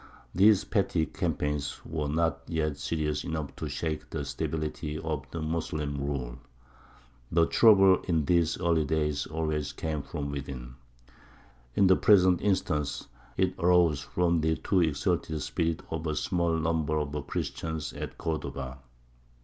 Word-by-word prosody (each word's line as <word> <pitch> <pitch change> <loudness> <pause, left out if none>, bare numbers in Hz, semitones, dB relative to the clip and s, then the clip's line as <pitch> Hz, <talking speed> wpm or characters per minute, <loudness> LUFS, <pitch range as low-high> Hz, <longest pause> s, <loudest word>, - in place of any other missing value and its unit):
These 100 +2 +5
petty 95 -6 +1
campaigns 75 -6 -2
were 75 -2 -2
not 80 +3 0
yet 75 -3 -1
serious 75 -2 -2
enough 80 -4 -4
to - - -4
shake 80 -2 -3
the 75 -3 -4
stability 75 +2 -3
of 75 -3 -4
the 80 -1 -5
Moslem 75 -2 -2
rule. 65 -4 -3 0.9
The 85 0 +4
trouble 95 -2 +6
in 80 -5 +1
these 85 0 +2
early 85 -2 +2
days 75 -1 0
always 75 -2 -2
came 75 -1 -3
from 70 -1 -5
within. 70 -4 -6 1.0
In 100 - +5
the 95 0 +6
present 95 -4 +5
instance 75 -8 -1 0.3
it 95 -1 +2
arose 85 -5 +4
from 85 +2 +1
the 80 +1 +2
too 95 +2 +1
exalted 80 0 0
spirit 80 -1 -1
of 80 0 -3
a 75 - -1
small 85 +1 0
number 80 -1 0
of 75 -1 -3
Christians 80 -1 -3
at - - -6
Cordova. 70 -5 -4
80 Hz, 140 wpm, -29 LUFS, 75-85 Hz, 1.0 s, trouble